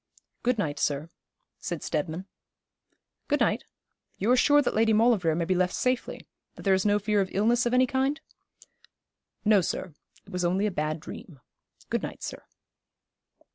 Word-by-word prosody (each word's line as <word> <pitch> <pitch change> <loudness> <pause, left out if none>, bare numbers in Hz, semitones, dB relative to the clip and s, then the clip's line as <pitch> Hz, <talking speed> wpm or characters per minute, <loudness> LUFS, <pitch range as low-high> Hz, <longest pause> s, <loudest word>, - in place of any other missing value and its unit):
'Good 245 0 +1
night, 145 -7 -2
sir,' 150 +3 -1 0.5
said 170 -3 -4
Steadman. 160 +4 -2 1.0
'Good - - +1
night. - - +1 0.5
You 215 +5 +1
are - - +6
sure 290 +3 +5
that 290 - +1
Lady 220 0 +3
Maulevrier 210 -8 +3
may 170 0 0
be 185 - +1
left 180 0 +1
safely 255 0 -1 0.3
that - - -11
there 195 - +3
is 190 +2 +2
no 205 0 +4
fear 210 0 +1
of 190 - -2
illness 235 +4 +2
of 240 - -1
any 255 +1 +5
kind?' 270 +4 0 1.3
'No, 210 -2 +5
sir. 175 0 -3 0.3
It 200 - -15
was 180 -1 -2
only 185 +4 +1
a 210 - 0
bad 155 -1 -2
dream. 160 -2 -10 0.5
Good - - +1
night, - - -7
sir.' - - -6
200 Hz, 170 wpm, -27 LUFS, 170-235 Hz, 1.3 s, are